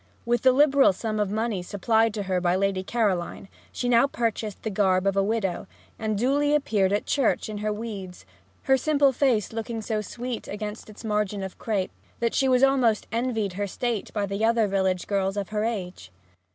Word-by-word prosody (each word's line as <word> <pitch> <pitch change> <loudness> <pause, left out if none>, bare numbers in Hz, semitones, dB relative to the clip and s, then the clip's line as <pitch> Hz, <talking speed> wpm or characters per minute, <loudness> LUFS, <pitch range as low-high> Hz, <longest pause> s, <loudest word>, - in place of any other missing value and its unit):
With 240 0 +1
the 260 - +6
liberal 280 -3 +5
sum 215 +2 -3
of 205 -2 +1
money 215 -2 -1
supplied 220 +5 +1
to 205 - -2
her 185 -2 -1
by 175 0 +2
Lady 195 0 0
Caroline 195 -3 -1 0.2
she 245 - -3
now 240 +2 +5
purchased 225 -5 -3
the 220 - -2
garb 190 -2 +2
of 195 -1 +2
a 195 - +3
widow, 195 -3 -1 0.3
and 215 -2 -1
duly 285 +6 +2
appeared 210 -10 +1
at 205 - 0
church 275 -5 +1
in 210 -1 -5
her 215 0 -1
weeds, 205 - -6 0.4
her 265 - +4
simple 285 0 +3
face 240 -5 +1
looking 225 0 -4
so 215 0 -2
sweet 240 +3 -6
against 210 +1 -6
its 215 +2 -12
margin 210 -2 -1
of 190 - -7
crape 205 -5 -1 0.3
that 235 -1 0
she 270 - +2
was 255 0 +3
almost 255 -5 +3
envied 225 -4 -1
her 200 +2 -2
state 235 +1 -3
by 205 -2 -1
the 200 +2 -3
other 230 0 +3
village 190 -2 0
girls 195 0 -1
of 200 -2 -3
her 215 0 -1
age. 180 - -4
215 Hz, 195 wpm, -25 LUFS, 195-235 Hz, 0.4 s, the